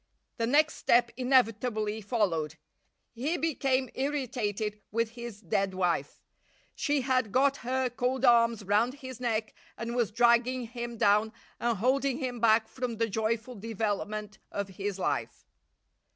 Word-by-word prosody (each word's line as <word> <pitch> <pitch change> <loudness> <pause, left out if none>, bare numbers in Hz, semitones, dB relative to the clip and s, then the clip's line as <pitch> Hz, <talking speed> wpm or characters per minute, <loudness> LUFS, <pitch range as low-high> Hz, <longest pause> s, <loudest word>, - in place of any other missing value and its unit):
The 230 -1 0
next 300 +4 +3
step 235 0 +3
inevitably 225 -4 +1
followed. 175 - -1 0.6
He 280 +9 -1
became 270 -5 +1
irritated 225 -7 -2
with 230 +1 0
his 235 -3 -8
dead 195 +1 0
wife. 180 -2 -1 0.5
She 290 -2 0
had 255 -4 +1
got 275 +3 +3
her 260 +1 -1
cold 250 +2 -1
arms 230 -2 +4
round 210 +6 +2
his 260 -3 -9
neck 225 -3 -1 0.2
and 235 +1 -4
was 240 -4 +1
dragging 240 +2 +3
him 235 0 -6
down 210 +1 +3 0.3
and 235 -2 0
holding 260 +4 +1
him 255 -4 -3
back 220 0 +4
from 250 -2 -4
the 230 0 0
joyful 225 +3 -1
development 210 -1 -3
of 200 -1 -3
his 195 +1 -4
life. 190 - -2
235 Hz, 135 wpm, -29 LUFS, 215-255 Hz, 0.6 s, arms